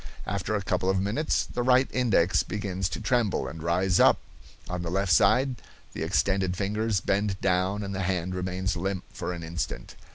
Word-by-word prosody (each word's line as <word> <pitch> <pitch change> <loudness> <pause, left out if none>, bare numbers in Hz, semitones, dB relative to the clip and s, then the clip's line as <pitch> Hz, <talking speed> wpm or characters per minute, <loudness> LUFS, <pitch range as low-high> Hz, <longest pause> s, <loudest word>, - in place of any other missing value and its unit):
After 100 +2 -2
a 100 - -1
couple 95 0 0
of 95 0 +2
minutes 105 +11 0
the 125 - -1
right 130 +1 +4
index 110 -8 +3
begins 95 -2 -3
to - - -4
tremble 120 -6 +1
and 80 0 -7
rise 90 +3 +2
up; - - +6 0.5
on 90 0 -3
the 85 - -3
left 95 0 +1
side 130 - +4 0.4
the - - -6
extended 95 -2 +1
fingers 105 0 0
bend 100 +1 0
down, 95 +2 +1
and 100 0 -4
the 95 - -2
hand 90 -1 -1
remains 95 +1 -2
limp 95 +1 -2
for - - -4
an 85 -2 -6
instant. 80 -7 -5
95 Hz, 185 wpm, -27 LUFS, 90-105 Hz, 0.5 s, up